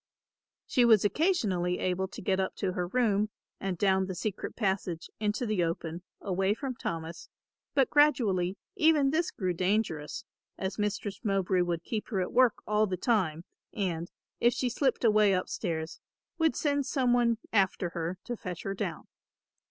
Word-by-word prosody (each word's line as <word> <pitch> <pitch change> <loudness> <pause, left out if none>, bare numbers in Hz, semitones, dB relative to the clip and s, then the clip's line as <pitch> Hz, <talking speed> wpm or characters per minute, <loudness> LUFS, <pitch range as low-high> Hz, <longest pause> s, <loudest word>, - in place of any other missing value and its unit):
She 250 - +3
was 220 -4 +6
occasionally 205 - +1
able 185 +1 -1
to - - -10
get 190 0 +1
up 190 - -1
to 190 - -1
her 180 -1 -2
room 210 -1 +2 0.3
and 190 -2 -2
down 190 0 +2
the 190 - -4
secret 205 +2 -4
passage 190 -5 -2
into 210 +3 0
the 215 -5 +1
open, 165 0 -3 0.2
away 195 +1 0
from 270 +1 -4
Thomas, 165 -6 -5 0.5
but 270 -3 +3
gradually 210 -11 +3 0.2
even 310 -6 +4
this 325 +2 +1
grew 185 -3 -2
dangerous, 180 -5 -1 0.3
as 190 +2 -3
Mistress 205 -1 -2
Mowbray 195 -3 +1
would 170 -1 -1
keep 215 +2 -3
her 200 -5 -1
at 180 - -2
work 250 -2 +4
all 210 0 +2
the 185 -1 -2
time, 175 -7 +1 0.3
and, 175 -4 -2 0.3
if 240 +1 +4
she 250 - 0
slipped 255 +2 0
away 215 -3 +5
upstairs, 165 -3 -2 0.4
would 320 -1 +3
send 285 -2 0
some 255 -4 +2
one 235 -2 +3 0.2
after 190 -3 +2
her 170 +1 -3
to 240 - -4
fetch 180 -7 -6
her 195 - -2
down. 195 - -4
195 Hz, 165 wpm, -30 LUFS, 180-235 Hz, 0.5 s, was